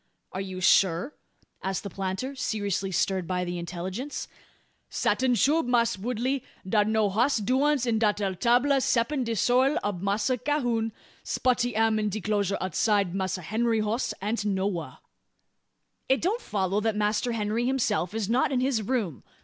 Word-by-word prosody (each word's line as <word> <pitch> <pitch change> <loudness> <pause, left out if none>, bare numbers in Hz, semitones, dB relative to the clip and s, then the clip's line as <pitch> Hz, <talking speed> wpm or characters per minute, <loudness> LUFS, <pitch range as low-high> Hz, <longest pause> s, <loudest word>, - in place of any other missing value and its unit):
"Are 190 - -4
you 185 -1 -6
sure?" 185 - +3 0.5
asked 190 0 -2
the 200 - -5
planter, 195 +9 -3
seriously 200 -5 -2
stirred 185 0 0
by 180 -1 -1
the 175 0 -4
intelligence. 185 - -5 0.6
"Satin, 255 -1 +1
shoo, 295 +9 +3
Mass' 235 -2 +2
Woodley. 250 +5 -2 0.2
Dar's 210 +1 +2
no 220 -1 +2
hoss 235 +8 +2
doins 260 +5 +2
in 230 -2 +1
dat 210 -2 +2
ere 195 -2 -1
'table, 250 +7 +3
ceppin 255 +3 +1
de 230 -1 -2
sorrel 255 +6 +3
ob 205 -4 -2
Massa 205 +5 0
Cahoon. 245 -5 0 0.3
Spotty 245 -2 0
am 220 0 +2
in 210 -1 0
de 210 +2 -3
'closure 200 -1 0
outside. 195 +1 +1
Massa 185 -1 -2
Henry 225 +5 +1
hoss 215 +4 -1
ain't 215 +1 -1
nowha." 190 -8 -2 1.1
"It 265 - +4
don't 420 +8 0
follow 200 - -1
that 220 -1 0
Master 210 +3 0
Henry 225 +2 -1
himself 220 -8 0
is 220 -3 -1
not 245 +5 +2
in 260 - +1
his 255 -3 +1
room. 210 - -2
215 Hz, 160 wpm, -27 LUFS, 195-245 Hz, 1.1 s, It